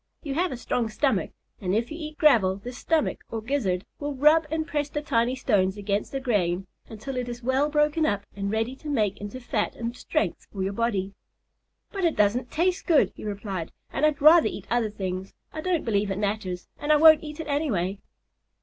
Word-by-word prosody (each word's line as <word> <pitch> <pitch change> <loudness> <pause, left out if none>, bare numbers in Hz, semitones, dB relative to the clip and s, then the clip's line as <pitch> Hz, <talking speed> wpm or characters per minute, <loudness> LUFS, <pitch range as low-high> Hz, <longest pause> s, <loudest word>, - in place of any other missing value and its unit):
You 285 -4 -3
have 355 +5 0
a 255 - -4
strong 235 -1 -1
stomach, 270 +5 0 0.3
and 185 0 0
if 230 +4 -1
you 310 - -5
eat 305 -1 -7
gravel 225 -12 +5
this 245 +5 -8
stomach 320 -2 0
or 225 - -3
gizzard 215 -7 -1
will 290 -1 -3
rub 305 +4 +5
and 315 +1 -1
press 295 -2 -2
the 295 - -2
tiny 235 -2 +1
stones 205 -7 +1
against 205 0 -2
the 270 - -2
grain 195 -8 0 0.2
until 235 +4 -6
it 250 -1 -2
is 240 0 -7
well 265 +4 +2
broken 300 +1 +2
up 205 -7 0
and 200 0 -3
ready 225 +4 -1
to 305 - -8
make 210 -8 0
into 205 +5 -6
fat 245 - -2
and 235 +1 -4
strength - - -2
for 195 -2 -3
your 195 +1 -2
body." 200 -3 -1 0.8
"But 390 -2 -4
it 335 -2 +2
doesn't 225 +4 +2
taste 360 +6 0
good," 290 - +4
he - - -10
replied, 200 -5 -4 0.2
"and 275 - -2
I'd 300 -2 +2
rather 320 +2 +8
eat - - -6
other 235 -2 +2
things. 190 -2 -5 0.2
I 310 - -4
don't 355 -2 0
believe 205 -3 +1
it 195 - -2
matters, 200 -3 -2
and 295 - 0
I - - +7
won't 315 0 +8
eat 300 0 -8
it 320 - -4
anyway." 215 - -1
240 Hz, 210 wpm, -26 LUFS, 200-300 Hz, 0.8 s, rather